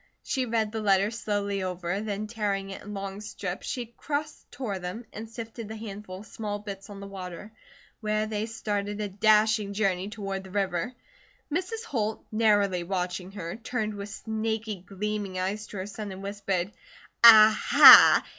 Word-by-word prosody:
She 260 -3 -1
read 225 -2 0
the 220 0 -3
letter 200 0 +3
slowly 205 -3 -2
over, 180 +1 -3
then 210 -1 -3
tearing 205 -3 -2
it 195 - -8
in 210 0 -8
long 195 +1 -5
strips 195 -3 -6
she 250 -4 -3
cross 290 +6 -5
tore 240 -7 -4
them 180 +7 -6
and 220 +1 -7
sifted 225 -1 -8
the 220 - -7
handful 205 -3 -8
of - - -13
small 210 -2 -5
bits 200 -1 -8
on 200 -1 -9
the 200 - -8
water, 190 +1 -8 0.5
where 215 -1 0
they 215 0 -3
started 205 -2 -3
a 210 - -2
dashing 215 +1 +3
journey 195 -2 0
toward 195 -2 -5
the 190 - -12
river. 195 +4 -2 0.6
Mrs. 410 +7 -2
Holt, 220 - -3
narrowly 205 -4 +2
watching 180 +1 -3
her, 170 -1 -6
turned 225 -2 -3
with 200 0 -7
snaky 220 0 -3
gleaming 200 +1 -4
eyes 200 +3 -3
to 205 - -9
her 185 - -4
son 205 0 -7
and 190 +1 -8
whispered: 195 -2 -2 0.5
"A 220 -2 +10
ha! - - +9
210 Hz, 170 wpm, -27 LUFS, 195-220 Hz, 0.6 s, A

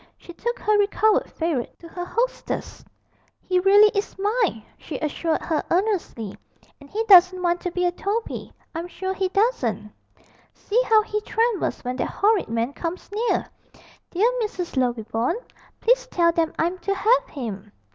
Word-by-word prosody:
She 345 - -12
took 475 +7 -3
her 425 -3 +2
recovered 415 +1 +2
favourite 320 -7 -2
to 335 - -12
her 355 +1 -6
hostess. 480 +6 -3 0.6
'He 365 -1 0
really 405 +3 +7
is 400 -1 -3
mine!' 405 - 0
she 315 - -7
assured 315 +2 -1
her 315 -3 0
earnestly; 355 - -1 0.4
and 285 -1 -15
he 440 +2 -1
doesn't 370 -3 +7
want 350 0 +1
to 360 - -3
be 360 +1 0
a 355 - +2
Toby, 410 +5 -3 0.2
I'm 335 +1 -4
sure 375 +1 -4
he 380 -1 -1
doesn't: 250 - 0 0.6
see 460 +4 +1
how 435 -1 +5
he 425 0 -3
trembles 450 -2 0
when 250 0 -3
that - - -1
horrid 415 -1 +2
man 230 +4 -1
comes 350 +5 -5
near. 450 +4 0 0.6
Dear 390 +6 +2
Mrs. 370 -7 -4
Lovibond, 240 - 0 0.4
please - - +3
tell 340 -7 +3
them 330 -1 0
I'm 350 +3 0
to 395 +2 -1
have - - +3
him!' 215 -7 -6
365 Hz, 160 wpm, -23 LUFS, 320-425 Hz, 0.6 s, really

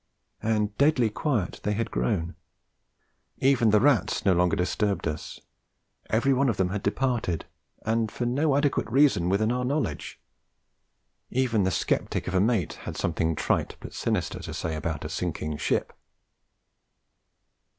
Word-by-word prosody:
And 105 -1 0
deadly 140 -6 +4
quiet 115 - -1
they 105 - 0
had 115 +2 -2
grown; 80 +8 -1 1.0
even 130 -4 +3
the 105 0 +5
rats 135 -2 +2
no 95 - +5
longer 90 -1 +2
disturbed 100 +1 0
us; 75 -1 -5 0.7
every 120 +5 +3
one 135 0 +2
of 115 - -1
them 95 -1 +1
had 100 +1 -3
departed, 110 - -1 0.4
and 110 0 +1
for 120 - -3
no 135 +4 +2
adequate 145 -5 +1
reason 130 -9 +4
within 110 +4 +2
our 125 +1 -1
knowledge. 125 - -2 1.1
Even 120 -6 +1
the - - +2
sceptic 90 - -1
of 90 - -3
a 95 - +3
mate 105 -6 +1 0.2
had - - -6
something 80 0 0
trite 75 - 0
but - - -9
sinister - - -1
to - - -7
say 80 -1 -3
about 75 -1 -3
'a - - -4
sinking 80 -2 -3
ship.' - - -1
105 Hz, 150 wpm, -27 LUFS, 90-125 Hz, 1.1 s, the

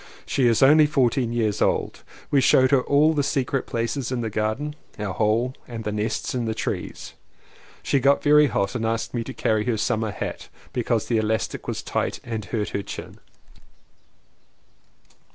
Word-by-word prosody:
She 130 -3 +2
is 115 +2 +3
only 150 +3 +7
fourteen 130 -4 +1
years 110 -3 0
old. - - 0 0.3
We 140 - +4
showed 130 +1 +4
her 135 -2 +5
all 150 +4 +3
the 150 - +1
secret 140 -2 -1
places 120 +2 -2
in 125 -2 -1
the 110 -2 -3
garden 110 +8 -2
— - - -29
our 105 -3 -3
hole, 110 +5 +1
and 115 -2 -6
the 105 - -2
nests 105 +1 -2
in 125 -2 -1
the 110 -1 -2
trees. - - -4 0.7
She 140 - +2
got 140 +2 +3
very 150 0 +6
hot 100 -5 -1
and 120 -3 -3
asked 115 0 -2
me 120 -2 -1
to - - -7
carry 110 -1 0
her 120 -3 0
summer 110 +1 0
hat - - -6 0.2
because - - 0
the 115 - 0
elastic 110 0 -1
was - - -3
tight - - -2
and 110 -3 -4
hurt 105 +2 -2
her 100 - -2
chin. - - -8
120 Hz, 180 wpm, -24 LUFS, 110-135 Hz, 0.7 s, only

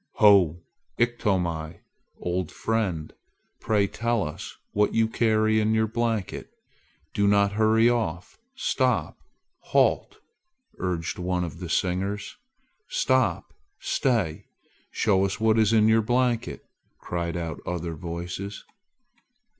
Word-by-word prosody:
"Ho, 90 -6 +5 0.3
Iktomi! 90 -9 -1 0.4
Old 90 +1 -2
fellow, 95 -9 -1 0.5
pray 105 -3 +2
tell 115 +2 -1
us 75 - -8
what 105 0 +1
you 115 0 +3
carry 110 -1 +2
in 110 +1 +2
your 110 0 +3
blanket. 115 -3 -2 0.6
Do 100 0 +2
not 100 0 +4
hurry 110 +2 +4
off! 105 -8 -2 0.2
Stop! 265 - 0 0.4
halt!" - - +1 0.6
urged 90 0 -2
one 90 0 -1
of 85 - -6
the 90 -2 -6
singers. 95 +4 -1 0.5
"Stop! - - +1 0.3
stay! 115 - 0 0.4
Show 95 -3 +2
us 100 +2 -1
what 110 0 +3
is 110 -1 +4
in 110 -1 +5
your 110 0 +5
blanket!" 120 +1 0 0.4
cried 85 -1 -3
out 85 -3 -5
other 85 -1 -3
voices. 85 +5 -6
100 Hz, 115 wpm, -26 LUFS, 90-110 Hz, 0.6 s, Ho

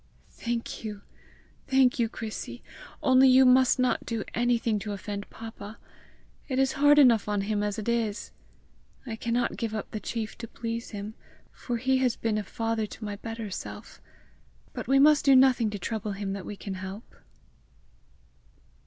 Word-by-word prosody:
"Thank 235 -1 -4
you! 210 -2 -6 0.6
thank 265 -2 +3
you, 230 -2 +2
Chrissy! 220 -1 -7 0.4
Only 260 0 +6
you 260 +1 +7
must 255 +1 +5
not 255 -1 +1
do 225 -3 -3
anything 235 -2 +1
to 210 0 -5
offend 200 +1 -6
papa! 225 -1 -9 0.7
It 260 - -2
is 265 0 +3
hard 290 +1 +5
enough 235 -7 +5
on 205 -1 0
him 205 +1 -1
as 205 -1 -2
it 215 - -5
is! 230 -3 -1 0.7
I 230 -3 -4
cannot 235 +1 -1
give 225 -1 -3
up 215 - -5
the 215 - -4
chief 220 0 -4
to 230 - -6
please 230 +1 -5
him, 205 0 -6 0.4
for 240 -2 -4
he 260 +2 +1
has 250 -3 +1
been 220 -2 -1
a - - -3
father 225 +1 -2
to 215 - -9
my 205 -1 -5
better 225 -1 -6
self; - - -8 0.7
but - - -6
we 270 - +4
must 295 +1 +6
do 275 -1 +6
nothing 255 -4 +5
to 210 - -5
trouble 210 +1 -3
him 195 0 -4
that 195 -2 -6
we 210 - -5
can 195 - -6
help!" 190 +3 -8
225 Hz, 170 wpm, -27 LUFS, 210-250 Hz, 0.7 s, you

